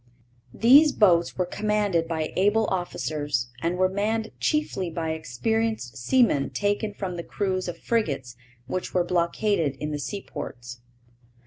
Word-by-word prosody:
These 280 +6 +7
boats 175 -5 +3
were 180 - +1
commanded 205 -3 0
by 160 -2 -3
able 205 +4 +3
officers 145 -8 -2
and 170 +2 -1
were 185 0 +4
manned 215 +3 -1
chiefly 300 - 0
by 160 -1 -3
experienced 160 - -2
seamen 145 - +2
taken 205 +1 -1
from 185 -3 -4
the 170 - -4
crews 185 -1 -2
of 175 - -5
frigates 140 - -1 0.3
which 180 +10 -4
were 180 - +4
blockaded 170 -2 0
in 150 +2 -4
the 150 - -3
seaports. 125 - -6
180 Hz, 135 wpm, -25 LUFS, 155-210 Hz, 0.3 s, These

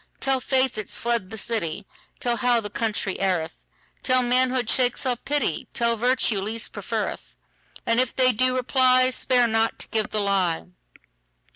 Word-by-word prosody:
Tell 270 -1 +1
faith 260 -2 +1
it's 210 - -4
fled 235 -5 -1
the 220 - -8
city; 200 -4 -3 0.3
Tell 240 -1 -1
how 245 +1 +2
the 205 -2 -6
country 210 -4 -1
erreth; 180 -5 -1 0.4
Tell, 255 -1 +2
manhood 250 0 +1
shakes 250 +1 +2
off 245 -2 -1
pity; 285 - -1
Tell, 235 0 +2
virtue 240 -3 +1
least 225 +3 -4
preferreth:And 230 +1 -5
if 255 -1 0
they 255 -1 +4
do 255 +2 +1
reply, 255 0 +3
Spare 250 -1 +2
not 225 0 +1
to - - -5
give 220 -2 -1
the 215 - -1
lie. 190 -4 0
235 Hz, 155 wpm, -24 LUFS, 215-255 Hz, 0.4 s, they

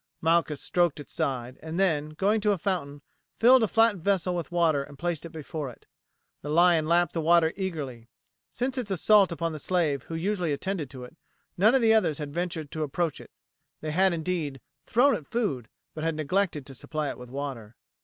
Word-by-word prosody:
Malchus 165 -2 +2
stroked 175 -4 +1
its 145 - -8
side, 130 -6 -2
and 160 +3 -5
then, 155 -6 +1
going 200 +8 +1
to 210 0 +3
a - - -2
fountain, 145 -6 -3 0.3
filled 250 +2 +6
a 220 - +3
flat 225 -1 +3
vessel 185 0 0
with 170 0 -4
water 165 -5 +2
and 140 0 -10
placed 170 0 -3
it - - -15
before 155 -2 -5
it. 120 - -15 0.6
The 145 - -6
lion 165 0 +4
lapped 170 -1 +2
the 165 - -1
water 165 0 +4
eagerly. 145 - -5 0.4
Since 255 +2 -2
its 230 -5 -4
assault 195 +1 +4
upon 165 0 -2
the 155 - -6
slave 155 -5 0
who 165 - -6
usually 175 -2 -1
attended 165 -1 -3
to 130 -1 -9
it, 125 +6 -12 0.4
none 210 +7 +4
of 265 - +3
the 225 -1 +5
others 185 -9 +2
had 145 -2 -6
ventured 170 -3 -3
to 155 - -4
approach 155 +2 -2
it. - - -14 0.5
They 155 - -3
had, 190 +4 +3
indeed, 160 -4 -2 0.3
thrown 265 +4 +4
it 155 - -8
food, 140 - -2 0.2
but 155 - -6
had 165 -1 0
neglected 155 -1 -1
to 135 - -10
supply 150 +3 -3
it - - -7
with 125 -1 -10
water. 130 -5 -6
165 Hz, 205 wpm, -27 LUFS, 145-190 Hz, 0.6 s, filled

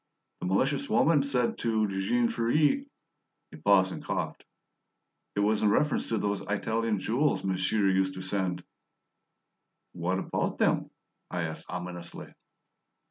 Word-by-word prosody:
"The - - -3
malicious 130 - +1
woman 155 -3 +4
said 130 -4 0
to 110 -2 +1
Jean 100 +5 +1
Ferret 150 - +2 0.3
" - - -52
He 80 - -10
paused 95 -2 +5
and - - -7
coughed. - - -3 0.9
"It 100 - +1
was 105 +1 +2
in 105 - +4
reference 150 +7 +1
to 115 - 0
those 100 -1 -1
Italian 110 +1 -1
jewels 125 +10 +1
monsieur 95 +2 +1
used 95 0 +2
to 95 - -6
send 95 -2 -1 0.7
" - - -53
"What 90 +2 +1
about - - -2
them?" - - +2 0.4
I 90 -2 -2
asked 80 -1 -6
ominously. 90 -1 -7
100 Hz, 140 wpm, -29 LUFS, 95-115 Hz, 0.9 s, paused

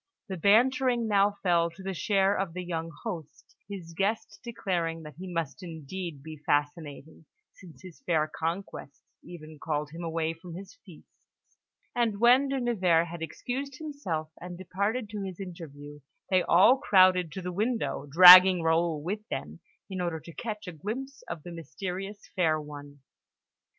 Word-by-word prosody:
The 190 - -3
bantering 240 +5 +3
now 200 -1 +2
fell 170 -2 +3
to 190 +3 -13
the 195 0 -3
share 195 +2 +2
of 190 -4 -2
the 180 +1 -5
young 165 -2 -4
host, 170 -10 -8
his 180 -5 -8
guests 205 +3 -2
declaring 175 -8 -3
that 150 0 -11
he 185 0 -7
must 160 -6 -3
indeed 165 -2 -7
be 155 0 -9
fascinating, 145 +1 -2 0.3
since 180 -2 -16
his 185 +2 -12
fair 160 - +1
conquests 165 -1 -5 0.2
even 155 -3 -11
called 150 -1 -3
him 165 +2 -8
away 165 -1 -1
from 165 +1 -11
his 190 +1 -10
feasts; 180 -6 -21 0.4
and 225 -4 0
when 250 +4 +5
De 270 0 -1
Nevers 180 -9 +2
had 170 0 -8
excused 260 - -5
himself, 235 - -4
and 175 0 -7
departed 200 +6 -2
to 210 -2 -5
his 190 -2 -6
interview, 145 -6 -9 0.3
they 185 -1 +4
all 195 +11 +5
crowded 185 -5 +4
to 190 - -5
the 180 0 -4
window, 215 - -2
dragging 180 +2 +10
Raoul 165 -2 +1
with 210 +5 -4
them, 75 +2 -5 0.3
in 190 -2 -5
order 170 -2 -2
to 165 +2 -12
catch 215 0 -6
a - - -4
glimpse 255 - -6
of 155 - -6
the 175 - -8
mysterious 190 +5 -6
fair 160 -4 +2
one. 145 -1 -10
180 Hz, 160 wpm, -28 LUFS, 160-200 Hz, 0.4 s, dragging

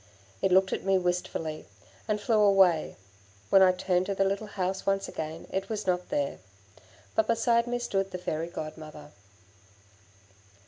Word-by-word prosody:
It 190 - +1
looked 190 +1 +4
at - - -3
me 195 0 +3
wistfully, 175 -3 -3 0.4
and 210 -1 0
flew 215 0 +2
away; 190 -6 +4 0.6
when 195 - +7
I 185 -1 +7
turned 180 0 0
to 200 - -1
the 195 - +2
little 195 +2 -1
house 190 -1 -3
once 195 0 0
again, 160 +1 -6
it 195 +1 -3
was 215 -2 -3
not 180 -1 -1
there. 140 -1 -1 0.7
But 220 - +2
beside 235 +1 +2
me 245 0 -1
stood 195 -5 -1
the 185 - -5
Fairy 165 -2 -3
Godmother. 155 -2 -8
190 Hz, 155 wpm, -28 LUFS, 175-200 Hz, 0.7 s, when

